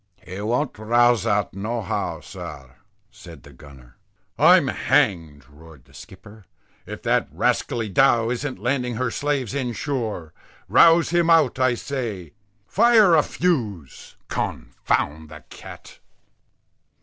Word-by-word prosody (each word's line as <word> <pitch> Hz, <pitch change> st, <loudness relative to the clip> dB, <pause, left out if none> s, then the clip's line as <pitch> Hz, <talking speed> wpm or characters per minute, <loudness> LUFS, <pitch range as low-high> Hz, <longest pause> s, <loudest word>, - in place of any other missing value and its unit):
"He 95 Hz, +2 st, -7 dB
won't 120 Hz, +3 st, -2 dB
rouse 120 Hz, +1 st, +2 dB
out 105 Hz, -1 st, 0 dB
no 110 Hz, +4 st, -4 dB
how, 95 Hz, -, -4 dB
sir," 65 Hz, -2 st, -10 dB, 0.4 s
said 80 Hz, -5 st, -14 dB
the 70 Hz, -, -15 dB
gunner. 65 Hz, -3 st, -17 dB, 0.4 s
"I'm -, -, +5 dB
hanged" 80 Hz, -7 st, 0 dB
roared 75 Hz, -2 st, -17 dB
the -, -, -24 dB
skipper, 105 Hz, +2 st, -14 dB, 0.4 s
"if -, -, -9 dB
that -, -, +1 dB
rascally 115 Hz, -2 st, -1 dB
dhow 115 Hz, +2 st, +2 dB
isn't 130 Hz, +1 st, -4 dB
landing 125 Hz, +3 st, -2 dB
her 125 Hz, 0 st, -2 dB
slaves 140 Hz, -4 st, -2 dB
inshore. 120 Hz, -, -4 dB, 0.3 s
Rouse 165 Hz, -, +5 dB
him 170 Hz, -1 st, +2 dB
out 155 Hz, -6 st, +3 dB
I 130 Hz, -1 st, +2 dB
say. 115 Hz, -, -6 dB, 0.3 s
Fire 220 Hz, -, +4 dB
a 160 Hz, -, +6 dB
fuse 110 Hz, -, -3 dB
_con_found 75 Hz, +2 st, -3 dB
the -, -, -12 dB
cat." -, -, -13 dB
115 Hz, 125 wpm, -22 LUFS, 85-135 Hz, 0.4 s, a